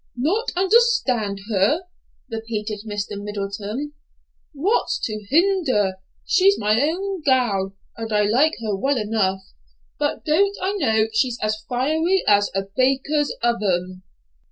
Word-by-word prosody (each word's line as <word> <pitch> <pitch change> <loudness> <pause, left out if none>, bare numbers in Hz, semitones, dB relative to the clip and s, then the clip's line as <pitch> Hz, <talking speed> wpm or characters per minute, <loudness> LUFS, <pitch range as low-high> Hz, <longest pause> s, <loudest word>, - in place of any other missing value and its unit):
"Not 360 - 0
understand 360 - +2
her?" 210 - +2 0.5
repeated 220 -2 -4
Mr. 205 -1 -4
Middleton. 205 +7 -4 0.6
"What's 340 +10 0
to 215 -2 -4
hinder? 280 - +2 0.3
She's 390 +1 +4
my 215 +3 +2
own 370 +5 -1
gal, 210 -9 +1 0.2
and 225 -1 -5
I 210 0 +3
like 255 +10 +3
her 210 -2 -1
well 270 +7 0
enough; 210 -4 0 0.6
but - - -2
don't 395 +7 +2
I 380 +2 -1
know 220 - +2
she's 245 +1 +1
as 215 0 -1
fiery 315 +9 +1
as 205 0 +4
a 195 - 0
baker's 275 +3 +1
oven?" 185 -6 0
235 Hz, 125 wpm, -22 LUFS, 205-310 Hz, 0.6 s, She's